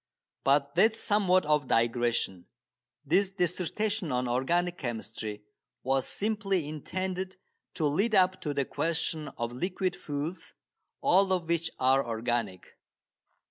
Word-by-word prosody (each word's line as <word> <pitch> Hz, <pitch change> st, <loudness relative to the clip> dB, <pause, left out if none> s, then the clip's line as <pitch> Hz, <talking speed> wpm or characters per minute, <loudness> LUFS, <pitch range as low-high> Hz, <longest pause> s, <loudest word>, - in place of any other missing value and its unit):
But 140 Hz, +1 st, +2 dB
that 220 Hz, +7 st, +5 dB
is 220 Hz, -, -5 dB
somewhat 190 Hz, -5 st, +3 dB
of 150 Hz, -1 st, +2 dB
a -, -, -16 dB
digression. 115 Hz, -6 st, +1 dB, 0.6 s
This 185 Hz, +7 st, +3 dB
dissertation 185 Hz, +1 st, -1 dB
on 125 Hz, 0 st, 0 dB
organic 170 Hz, +8 st, 0 dB
chemistry 110 Hz, -3 st, -5 dB, 0.4 s
was 135 Hz, 0 st, +2 dB
simply 195 Hz, -6 st, -1 dB
intended 185 Hz, +5 st, -4 dB, 0.4 s
to 160 Hz, -, 0 dB
lead 200 Hz, +10 st, +2 dB
up 185 Hz, -1 st, +3 dB
to 150 Hz, -, -2 dB
the 140 Hz, -, +1 dB
question 160 Hz, -1 st, -1 dB
of 120 Hz, 0 st, -3 dB
liquid 180 Hz, +6 st, -2 dB
fuels, 150 Hz, +5 st, -5 dB, 0.5 s
all 190 Hz, +1 st, +4 dB
of 180 Hz, -3 st, 0 dB
which 170 Hz, -1 st, 0 dB
are 135 Hz, +1 st, +3 dB
organic. 115 Hz, -4 st, -3 dB
160 Hz, 130 wpm, -29 LUFS, 125-185 Hz, 0.6 s, that